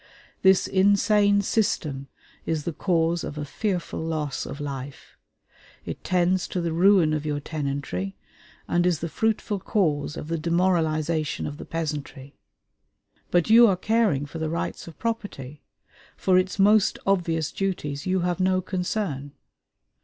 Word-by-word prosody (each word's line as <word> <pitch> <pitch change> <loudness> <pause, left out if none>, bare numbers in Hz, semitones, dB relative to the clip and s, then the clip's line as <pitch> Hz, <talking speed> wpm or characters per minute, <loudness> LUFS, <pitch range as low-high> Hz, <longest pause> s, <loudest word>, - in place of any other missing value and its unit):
This 190 -1 +5
insane 200 +1 +3
system 155 -11 -1 0.4
is 160 -2 -1
the 170 - -3
cause 170 0 +1
of 150 - -6
a 150 - -3
fearful 185 +3 -3
loss 155 -3 -3
of 145 - -7
life; 140 -1 -7 0.7
it - - -6
tends 180 0 +1
to 180 - -3
the 170 -2 -1
ruin 175 -2 +4
of 155 -1 -1
your 150 -1 -2
tenantry, 140 - -4 0.5
and 175 +1 +2
is 175 -3 +2
the 165 - -2
fruitful 210 +3 -1
cause 155 -8 0
of - - -6
the 165 0 -2
demoralization 165 -2 0
of 145 - -5
the - - -8
peasantry. 145 -4 -5 1.0
But 175 +4 +2
you 235 +1 +9
are 190 -3 +2
caring 210 -8 +1
for 155 +3 -8
the 160 -1 -2
rights 170 +1 -4
of 165 - -11
property; 205 - -5 0.6
for 185 - +2
its 185 +1 -2
most 205 +1 +4
obvious 165 -5 +1
duties 160 -6 -3
you 185 0 +1
have 175 +1 -1
no 185 0 +2
concern. 180 -6 -3
170 Hz, 145 wpm, -25 LUFS, 150-190 Hz, 1.0 s, you